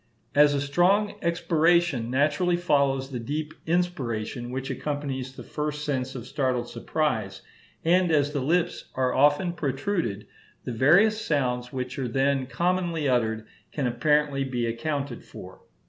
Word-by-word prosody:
As 145 0 +5
a 140 - 0
strong 180 +8 +2
expiration 170 -6 +2
naturally 150 +7 +2
follows 140 -5 +1
the 125 - -3
deep 150 +6 -4
inspiration 125 -10 -1
which 130 +1 -4
accompanies 140 -3 -3
the - - -10
first 150 0 -4
sense 130 -2 -2
of 125 -2 -6
startled 130 -4 -1
surprise, 115 -13 -2 0.4
and 175 +1 +3
as 145 -1 +2
the 145 - 0
lips 165 +6 0
are 130 -1 +1
often 145 +6 +3
protruded, 140 - -2 0.4
the - - -4
various 195 - +4
sounds 125 -5 -1
which 130 0 -4
are 130 - -1
then 135 +2 +1
commonly 170 -1 0
uttered 110 -3 +1 0.3
can 145 - -2
apparently 150 +2 +1
be 125 -3 -2
accounted 140 +2 -3
for. - - -12
140 Hz, 140 wpm, -26 LUFS, 130-165 Hz, 0.4 s, As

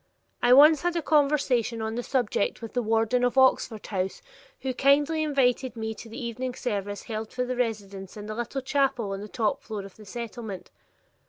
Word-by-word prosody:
I 245 - +4
once 295 +3 +8
had 350 0 0
a 335 - +1
conversation 280 -7 +2
on 220 0 -2
the 240 - -2
subject 245 -5 0
with 225 - -7
the 245 - +1
warden 225 +2 +1
of 245 +2 +1
Oxford 260 -4 +3
House, 190 -2 -3 0.4
who 260 -1 -2
kindly 290 +4 +3
invited 265 -4 +1
me 220 -1 -3
to 225 - -11
the 225 - -7
evening 245 +1 -4
service 205 -4 -3
held 220 -1 -5
for 250 0 -2
the 255 0 -2
residents 205 -5 -3
in 210 0 -7
a 215 - -4
little 240 +4 -3
chapel 265 -6 +1
on 195 0 -4
the 210 - -7
top 215 -1 -1
floor 215 -3 -6
of 195 - -13
the 215 - -13
Settlement. 220 -3 -7
235 Hz, 195 wpm, -27 LUFS, 215-260 Hz, 0.4 s, once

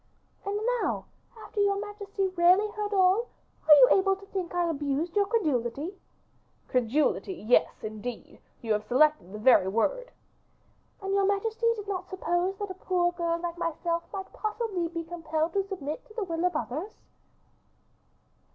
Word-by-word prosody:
"And 405 +1 -1 0.2
now, - - -1 0.3
after 415 - -4
your 400 0 +2
majesty 405 -2 -3
really 370 +4 +4
heard 420 -1 -3
all, 390 +4 +3 0.4
are 310 - +10
you 265 -3 +8
able 390 0 +4
to 395 +1 -14
think 380 -3 -4
I 350 -1 +2
abused 300 +2 -2
your 405 -1 +3
credibility?" 300 - -1 0.7
"Credulity; 260 - +1
yes, 240 -5 +1
indeed, 215 +3 -7 0.2
you 225 -2 +1
have 210 0 -2
selected 295 -5 +3
the 210 - -6
very 215 -4 +5
word." - - 0 0.9
"And 390 0 -1
your 395 -1 +3
majesty 445 +3 0
did 415 -2 -8
not 390 -2 -4
suppose 370 0 -1
that 405 -1 -4
a 375 - -12
poor 350 -1 +3
girl 340 -1 -1
like 345 0 -5
myself 335 0 -1
might 385 -2 -6
possibly 425 -5 -2
be 335 0 -5
compelled 325 -1 -2
to 395 -1 0
submit 310 -7 -5
to 430 - -17
the 450 - -1
will 335 -1 -2
of 360 - +1
others?" 320 - -3
355 Hz, 160 wpm, -28 LUFS, 305-400 Hz, 0.9 s, are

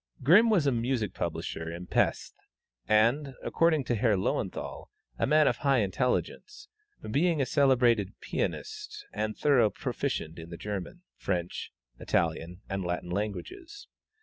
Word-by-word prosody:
Grimm 195 - +7
was 190 -9 +3
a 140 - +3
music 115 -4 -1
publisher 80 0 -4
in 85 +2 -7
Pesth, - - 0 0.5
and, 125 +6 +3
according 165 -4 +2
to 120 - -1
Herr 110 -1 +2
Löwenthal, 95 - -3 0.3
a - - +2
man 155 -1 +5
of - - +1
high 140 -2 +2
intelligence, 140 - -2 0.4
being 160 +5 +2
a 135 - +2
celebrated 125 -8 +2
pianist 425 -1 -4
and 110 0 -2
a - - -30
thorough 130 -7 +4
proficient 80 -4 -3
in 80 +1 -9
the 85 - -7
German, 105 - -6
French, 90 -2 -3 0.3
Italian, 85 +2 -1
and 95 0 -3
Latin 90 0 -3
languages. 330 - -5
120 Hz, 140 wpm, -29 LUFS, 95-155 Hz, 0.5 s, Grimm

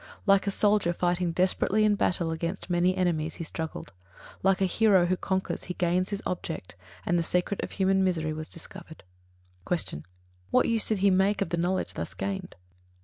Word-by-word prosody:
Like 195 -1 +4
a - - +4
soldier 205 -3 +2
fighting 175 0 0
desperately 190 +4 +2
in 210 - +4
battle 175 -4 0
against 170 +3 -4
many 180 +2 +2
enemies, 165 -4 0
he - - -5
struggled: 160 -6 -6 0.5
like 195 0 +3
a 195 - +3
hero 190 -1 +4
who 180 +1 +1
conquers, 190 +1 -2
he 180 - -5
gained 180 +2 +1
his 200 -1 -4
object, 165 - -4 0.3
and 175 0 +2
the - - +2
secret 180 +4 -1
of - - -5
human 190 0 +2
misery 160 -4 0
was 155 0 -5
discovered. 170 -1 -9 0.7
66. 175 - +2
Q. 75 - -7 0.5
_What - - +4
use 230 -2 +2
did 215 - +1
he 200 - +6
make 195 +2 +2
of 180 - -8
the 170 - -1
knowledge 180 +2 0
thus - - -5
gained? 190 -2 -4
180 Hz, 190 wpm, -28 LUFS, 170-195 Hz, 0.7 s, he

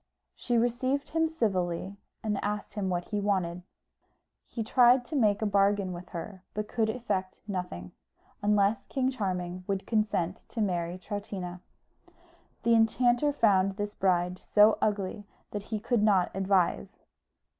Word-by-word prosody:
She 240 -2 -1
received 255 +4 0
him 325 0 +1
civilly, 190 - -1 0.3
and 210 -2 -1
asked 205 0 -3
him 200 -3 -2
what 175 -1 -2
he 210 -1 -1
wanted. 180 -4 0 0.9
He 230 - -4
tried 245 +2 +5
to 310 - -6
make 215 -5 +2
a - - +2
bargain 200 -2 +2
with 175 +1 -9
her 185 +3 -7
but 210 0 -2
could 220 -1 0
effect 190 -5 -2
nothing, 180 - -5 0.5
unless 205 0 +2
King 260 -1 0
Charming 185 -6 -3
would 195 -1 -2
consent 210 -5 0
to 235 - -6
marry 175 -4 -1
Troutina. 185 -2 -6 1.0
The 235 0 +4
enchanter 240 +5 +3
found 195 -8 +3
this 205 0 -3
bride 180 -2 +1
so 210 +1 +4
ugly 205 0 -1 0.2
that 205 - -3
he 220 -2 -2
could 235 +1 +1
not 200 -4 +3
advise. 190 - 0
205 Hz, 145 wpm, -29 LUFS, 185-225 Hz, 1.0 s, tried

